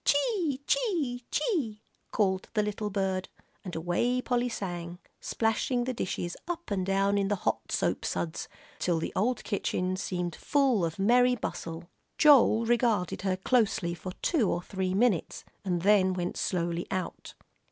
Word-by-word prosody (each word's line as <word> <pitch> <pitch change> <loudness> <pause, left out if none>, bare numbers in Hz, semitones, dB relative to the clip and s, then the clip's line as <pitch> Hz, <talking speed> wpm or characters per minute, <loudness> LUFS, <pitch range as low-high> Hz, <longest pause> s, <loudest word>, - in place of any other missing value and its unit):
"Chee 295 - +1
chee 320 - 0
chee," 240 - -1 0.3
called 190 -3 0
the 210 - +3
little 210 0 -2
bird, 190 -2 -1 0.3
and 180 -3 -6
away 175 +10 +1
Polly 245 -1 0
sang, 175 -5 -5 0.2
splashing 235 +2 0
the 255 +1 -2
dishes 175 -5 -3
up 345 -7 -5
and 190 -2 0
down 195 +1 +2
in 195 - +1
the 205 - +1
hot - - -1
soap - - 0
suds, 85 -2 -3 0.3
till 175 -2 +1
the 160 - -3
old 235 +5 +1
kitchen 185 -2 -1
seemed 180 -3 -3
full 270 -9 +2
of 165 -1 -2
merry 245 +5 +4
bustle. 170 -5 -5 0.3
Joel 260 -6 +6
regarded 230 -6 +1
her 190 -1 0
closely 195 -5 +1
for 180 +2 -7
two 260 - +2
or 175 - -1
three 190 -1 -2
minutes, 205 -5 +1 0.2
and 175 -3 -1
then 195 -2 +4
went 180 -1 -3
slowly 170 -1 -1
out. 185 -1 -4
200 Hz, 150 wpm, -29 LUFS, 180-245 Hz, 0.3 s, Joel